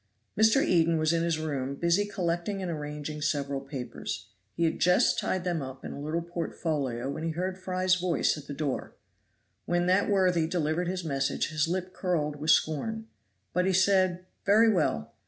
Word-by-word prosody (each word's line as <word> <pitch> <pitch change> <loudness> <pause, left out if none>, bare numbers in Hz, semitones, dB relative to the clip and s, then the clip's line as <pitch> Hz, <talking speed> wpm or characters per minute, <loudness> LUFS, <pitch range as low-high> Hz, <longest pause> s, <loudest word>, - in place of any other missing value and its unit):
Mr. 220 +6 +4
Eden 165 -2 +3
was 155 +1 +2
in 165 - +1
his 165 -1 +1
room 140 -4 -3
busy 170 +7 +2
collecting 190 0 -2
and 185 -2 -3
arranging 150 0 -5
several 140 -2 -1
papers. 130 -6 -6 0.3
He 170 - 0
had 165 - +1
just 180 +1 +4
tied 185 -2 -1
them 175 -3 -1
up 130 0 -8
in - - -5
a 140 - -7
little 160 +3 -2
portfolio 155 -7 -3
when 155 - -5
he 165 - -1
heard 180 +3 -2
Fry's 185 0 0
voice 180 -2 +1
at 145 -2 -10
the 145 - -5
door. 145 -3 -3 0.7
When 175 0 +1
that 185 +3 +3
worthy 180 -5 +3
delivered 165 +1 0
his 185 0 -2
message 135 -2 -1
his 155 0 0
lip 185 +1 -3
curled 150 -5 -1
with 155 +2 -3
scorn. 220 +10 +1 0.4
But 180 +1 +2
he 190 - +2
said, 185 -1 +3 0.2
"Very 220 +3 +5
well." 150 - 0
170 Hz, 180 wpm, -28 LUFS, 150-185 Hz, 0.7 s, Very